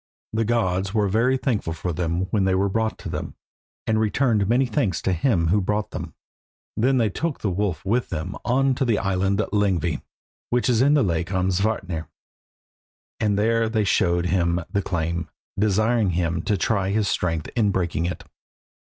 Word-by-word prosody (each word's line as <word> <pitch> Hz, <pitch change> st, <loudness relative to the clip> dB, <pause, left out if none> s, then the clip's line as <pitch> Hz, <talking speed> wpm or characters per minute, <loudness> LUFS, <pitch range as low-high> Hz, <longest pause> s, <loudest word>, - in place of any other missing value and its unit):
The 110 Hz, 0 st, +1 dB
gods 100 Hz, -3 st, 0 dB
were 105 Hz, -2 st, +3 dB
very 115 Hz, +6 st, +2 dB
thankful 110 Hz, -, -1 dB
for 85 Hz, +2 st, -3 dB
them 85 Hz, +1 st, -1 dB
when 105 Hz, -3 st, +2 dB
they 95 Hz, 0 st, +2 dB
were 100 Hz, +1 st, +1 dB
brought 110 Hz, +2 st, -1 dB
to -, -, -8 dB
them, -, -, -5 dB, 0.5 s
and 110 Hz, 0 st, +1 dB
returned 110 Hz, -1 st, +1 dB
many 125 Hz, +3 st, +3 dB
thanks 105 Hz, -5 st, 0 dB
to 95 Hz, -, +1 dB
him 85 Hz, -3 st, +1 dB
who 100 Hz, +3 st, +3 dB
brought 105 Hz, +2 st, -1 dB
them. -, -, -6 dB, 0.6 s
Then 130 Hz, +4 st, +2 dB
they 115 Hz, -4 st, +2 dB
took 160 Hz, -, -3 dB
the 100 Hz, -, 0 dB
wolf 90 Hz, -3 st, -2 dB
with 120 Hz, +5 st, 0 dB
them 90 Hz, +2 st, -4 dB
on 135 Hz, +2 st, +2 dB
to 130 Hz, -, -1 dB
the 115 Hz, -5 st, +2 dB
island 95 Hz, 0 st, 0 dB, 0.2 s
Lyngvi, 90 Hz, -6 st, +1 dB, 0.5 s
which 125 Hz, +1 st, +1 dB
is 120 Hz, -1 st, +3 dB
in 145 Hz, +3 st, +5 dB
the 145 Hz, -, +4 dB
lake 85 Hz, -3 st, -1 dB
Amsvartnir, 95 Hz, -2 st, -1 dB, 1.1 s
and 105 Hz, -2 st, +1 dB
there 115 Hz, +1 st, +2 dB
they 110 Hz, -1 st, +1 dB
showed 90 Hz, -3 st, +2 dB
him 85 Hz, -1 st, +1 dB
the 100 Hz, -1 st, +1 dB
chain, 85 Hz, -2 st, -2 dB, 0.3 s
desiring 110 Hz, +1 st, +2 dB
him 85 Hz, -1 st, 0 dB
to 105 Hz, -2 st, +1 dB
try 95 Hz, +2 st, 0 dB
his 105 Hz, +1 st, +1 dB
strength 80 Hz, -5 st, -1 dB
in 110 Hz, -4 st, +3 dB
breaking 85 Hz, -4 st, -1 dB
it. 90 Hz, -, -5 dB
100 Hz, 180 wpm, -23 LUFS, 90-110 Hz, 1.1 s, in